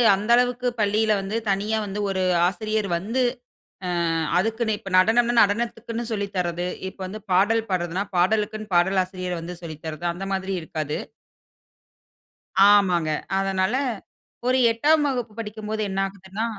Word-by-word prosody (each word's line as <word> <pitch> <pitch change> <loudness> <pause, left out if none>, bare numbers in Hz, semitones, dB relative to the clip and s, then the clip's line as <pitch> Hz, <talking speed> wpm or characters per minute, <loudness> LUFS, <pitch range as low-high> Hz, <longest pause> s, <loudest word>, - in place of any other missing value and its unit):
அந்த 205 +3 -5
அளவுக்கு 245 0 +1
பள்ளியில 215 +1 +2
வந்து 195 +3 -4
தனியா 210 +3 0
வந்து 200 +1 -5
ஒரு 190 -1 0 0.2
ஆசிரியர் 215 +2 -1
வந்து 225 +9 -1 0.7
ஆ - - -2 0.5
அதுக்குன்னு 225 +3 0
இப்ப 195 - -9
நடனம்னா, 235 +5 +4
நடனத்துக்குன்னு 230 +2 0
சொல்லி 200 -2 -1
தர்றது. 175 -1 -1 0.2
இப்ப 190 - -10
வந்து 210 +4 -6
பாடல் 205 +5 +4
பாடுறதுனா, 180 +1 -1
பாடலுக்குன்னு 215 +3 0
பாடல் 190 +2 +3
ஆசிரியர் 180 -1 -5
வந்து 170 +2 -6
சொல்லி 165 -2 -7
தர்றது 160 +2 -5
அந்த 190 +3 -6
மாதிரி 190 0 -2
இருக்காது. 155 -2 -4 1.7
ஆமாங்க. 180 -6 +3 0.3
அதனால 195 +2 +1 0.7
ஒரு 255 - +3
8 295 +6 +3
வகுப்பு 245 -5 -2
படிக்கும்போது 215 0 -4
என்ன 190 0 -2
ஆகுதுன்னா 195 +3 -5
200 Hz, 135 wpm, -24 LUFS, 185-220 Hz, 1.7 s, நடனம்னா